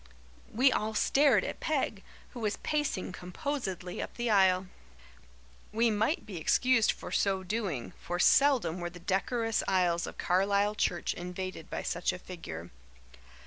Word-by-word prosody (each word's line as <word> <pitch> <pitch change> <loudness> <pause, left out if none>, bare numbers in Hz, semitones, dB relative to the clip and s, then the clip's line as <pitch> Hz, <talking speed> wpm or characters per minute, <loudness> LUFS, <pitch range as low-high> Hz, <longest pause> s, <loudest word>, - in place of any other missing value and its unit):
We 255 +4 +4
all 220 -2 -1
stared 270 -4 +4
at - - -5
Peg, 270 -10 -1 0.3
who 245 - -9
was 215 -2 -1
pacing 295 -12 -1
composedly 180 -1 -4
up - - -6
the 240 -1 -1
aisle. 190 -2 +4 1.1
We 230 +2 +2
might 220 +5 0
be 200 -5 -7
excused 230 +8 +3
for 180 - -9
so 190 0 +1
doing, 185 - -3
for 175 - -3
seldom 245 - +4
were 175 0 -3
the 180 +1 -12
decorous 225 +5 0
aisles 180 -3 +2
of - - -9
Carlisle 200 +3 +2
church 175 -4 0
invaded 180 -1 -6
by - - -4
such 175 +1 -1
a 180 - -6
figure. 85 - -8
195 Hz, 145 wpm, -30 LUFS, 180-230 Hz, 1.1 s, We